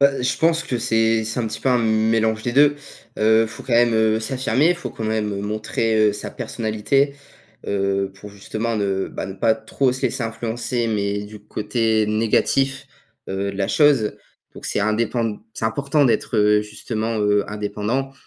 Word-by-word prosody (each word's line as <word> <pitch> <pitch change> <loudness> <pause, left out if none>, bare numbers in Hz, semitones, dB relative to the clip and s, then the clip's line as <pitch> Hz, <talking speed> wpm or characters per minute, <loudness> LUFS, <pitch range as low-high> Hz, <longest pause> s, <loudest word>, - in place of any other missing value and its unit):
Bah, 140 0 +6
heu, - - -3
je 125 - 0
pense 165 0 +3
que 125 - -2
c'est 115 -1 +2
c'est 110 +3 -3
un 115 - -1
petit 110 - -5
peu - - 0
un 125 -1 +4
mélange 110 0 +1
des 120 - -2
deux. 145 +2 +5 0.4
Heu, 110 +1 +4
faut 115 +1 -10
quand 125 - -5
même, 120 0 +4
heu, 110 0 +2
s'affirmer, 130 +7 +1
faut 175 - -6
quand 110 - -6
même 110 -2 -1
montrer, 110 +2 -1
heu, 105 - +1
sa - - -6
personnalité. 115 +6 -1 0.5
Heu, 100 -1 0
pour 105 +1 -11
justement 110 +3 -3
ne, 100 -2 -1
bah, - - -5
ne 95 - -7
pas 110 +2 +2
trop 120 +4 0
se 130 - -7
laisser - - -1
influencer, 115 +1 -2
mais 100 -1 -1
du 105 +1 -10
côté 110 +1 0
négatif, 130 +5 +1 0.4
heu, 100 +1 -2
de - - -8
la 95 -1 -1
chose. 145 -8 +3 0.4
Donc - - -7
c'est - - -1
indépend 110 +1 0 0.2
c'est - - -4
important 140 +6 +1
d'être, 120 -2 +1
heu, 105 0 +4
justement, 110 +1 -3
heu, 105 0 +2
indépendant. 105 +6 -2
110 Hz, 185 wpm, -21 LUFS, 105-120 Hz, 0.5 s, Bah